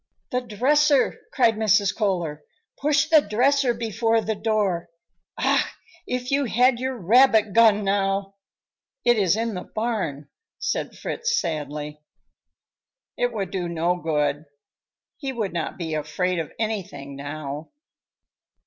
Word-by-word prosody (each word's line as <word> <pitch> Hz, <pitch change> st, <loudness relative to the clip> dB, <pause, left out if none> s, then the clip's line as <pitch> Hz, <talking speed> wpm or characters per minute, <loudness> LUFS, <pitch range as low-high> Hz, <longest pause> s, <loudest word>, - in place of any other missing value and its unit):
"The 250 Hz, -, 0 dB
dresser," 270 Hz, +5 st, +2 dB
cried 230 Hz, -4 st, +3 dB
Mrs. 215 Hz, -2 st, +3 dB
Kohler; 175 Hz, -8 st, -1 dB, 0.3 s
"push 295 Hz, +1 st, +2 dB
the 315 Hz, -2 st, +7 dB
dresser 260 Hz, +5 st, +2 dB
before 225 Hz, 0 st, +1 dB
the 220 Hz, 0 st, -1 dB
door. 205 Hz, -5 st, -1 dB, 0.5 s
Ach, -, -, +3 dB, 0.4 s
if 250 Hz, +1 st, -3 dB
you 280 Hz, 0 st, +2 dB
had 245 Hz, +2 st, +3 dB
your 260 Hz, 0 st, -2 dB
rabbit 220 Hz, +1 st, +4 dB
gun, 220 Hz, -2 st, +5 dB
now!" 195 Hz, 0 st, 0 dB, 0.7 s
"It 240 Hz, 0 st, +5 dB
is 190 Hz, -2 st, +3 dB
in 225 Hz, 0 st, -1 dB
the 180 Hz, -, -4 dB
barn," 205 Hz, -11 st, -2 dB, 0.3 s
said -, -, -3 dB
Fritz 470 Hz, 0 st, -1 dB
sadly. 150 Hz, -1 st, -4 dB, 1.1 s
"It 245 Hz, 0 st, 0 dB
would 195 Hz, -5 st, -4 dB
do 180 Hz, -3 st, -2 dB
no 170 Hz, +1 st, 0 dB
good; 150 Hz, -3 st, -1 dB, 0.7 s
he 275 Hz, -2 st, -4 dB
would 215 Hz, -8 st, -3 dB
not 170 Hz, -2 st, -3 dB
be 165 Hz, -3 st, -4 dB
afraid 165 Hz, +4 st, -1 dB
of 160 Hz, -, -4 dB
anything 175 Hz, -11 st, -4 dB
now. 145 Hz, +1 st, -6 dB
210 Hz, 130 wpm, -24 LUFS, 170-240 Hz, 1.1 s, the